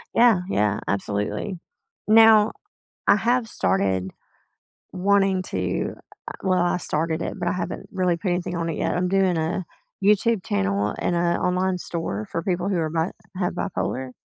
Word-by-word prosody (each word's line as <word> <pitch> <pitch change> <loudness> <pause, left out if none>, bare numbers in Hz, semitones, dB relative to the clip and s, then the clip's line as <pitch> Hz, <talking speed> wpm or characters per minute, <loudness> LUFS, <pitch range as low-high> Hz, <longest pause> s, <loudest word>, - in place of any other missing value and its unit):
Yeah, 230 -6 +5
yeah, 105 - +1
absolutely. 105 - -2 0.5
Now, 220 0 +7 0.6
I - - +6
have 235 +2 +1
started 95 - 0 0.8
wanting 195 0 +2
to, - - -2 0.3
uh - - -4
well, 185 -2 +2
I 175 0 +1
started 160 -1 -1
it, - - -3
but 175 -1 -1
I - - +1
haven't 180 - -4
really 180 -3 +1
put 185 +1 -2
anything 175 0 -2
on 170 0 -2
it 160 - -4
yet, - - 0
I'm 180 +1 0
doing 190 -2 +2
a 160 +4 -1 0.4
YouTube 210 +1 +3
channel 100 +1 0
and 175 - 0
a 170 0 +1
online 180 0 0
store 135 - -4
for 165 - -2
people 180 +1 -1
who 195 - 0
are 160 -1 -1
bi 165 +2 0 0.3
have 180 -2 -1
bipolar. 130 -8 -3
180 Hz, 165 wpm, -24 LUFS, 155-195 Hz, 0.8 s, Now